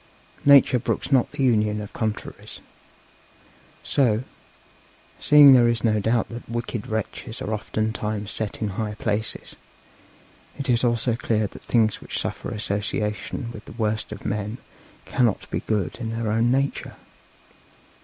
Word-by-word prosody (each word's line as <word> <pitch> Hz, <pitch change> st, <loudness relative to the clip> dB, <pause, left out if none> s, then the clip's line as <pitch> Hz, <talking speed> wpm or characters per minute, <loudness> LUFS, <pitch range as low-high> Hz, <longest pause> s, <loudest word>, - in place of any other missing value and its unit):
Nature 140 Hz, -3 st, +7 dB
brooks 125 Hz, -, -2 dB
not 130 Hz, -3 st, +3 dB
the 135 Hz, -, -2 dB
union 105 Hz, -4 st, +2 dB
of 105 Hz, -1 st, -8 dB
contraries. 110 Hz, -2 st, -5 dB, 1.2 s
So, 120 Hz, -4 st, +2 dB, 1.0 s
seeing 145 Hz, -2 st, +8 dB
there 120 Hz, -2 st, +6 dB
is 115 Hz, -1 st, -1 dB
no 110 Hz, -2 st, +3 dB
doubt 110 Hz, +2 st, +1 dB
that 120 Hz, 0 st, -9 dB
wicked 120 Hz, -2 st, -4 dB
wretches 110 Hz, +2 st, -4 dB
are 110 Hz, -, -3 dB
oftentimes 110 Hz, -1 st, -2 dB
set 110 Hz, 0 st, -4 dB
in 105 Hz, -, 0 dB
high 105 Hz, +2 st, -3 dB
places, 105 Hz, 0 st, -3 dB, 1.0 s
it 140 Hz, -2 st, -1 dB
is 120 Hz, 0 st, +2 dB
also 120 Hz, -1 st, +2 dB
clear 110 Hz, -1 st, 0 dB
that -, -, -9 dB
things 110 Hz, -3 st, +1 dB
which -, -, -5 dB
suffer -, -, -4 dB
association 105 Hz, +3 st, -3 dB
with 110 Hz, -2 st, -10 dB
the -, -, -11 dB
worst 110 Hz, -2 st, -2 dB
of 105 Hz, -, -8 dB
men 105 Hz, +2 st, -2 dB, 0.5 s
cannot 120 Hz, -5 st, +1 dB
be -, -, 0 dB
good 100 Hz, -7 st, -2 dB
in 115 Hz, -2 st, -3 dB
their 115 Hz, -1 st, -2 dB
own 115 Hz, +2 st, +2 dB
nature. 135 Hz, +2 st, -1 dB
110 Hz, 145 wpm, -24 LUFS, 105-120 Hz, 1.2 s, seeing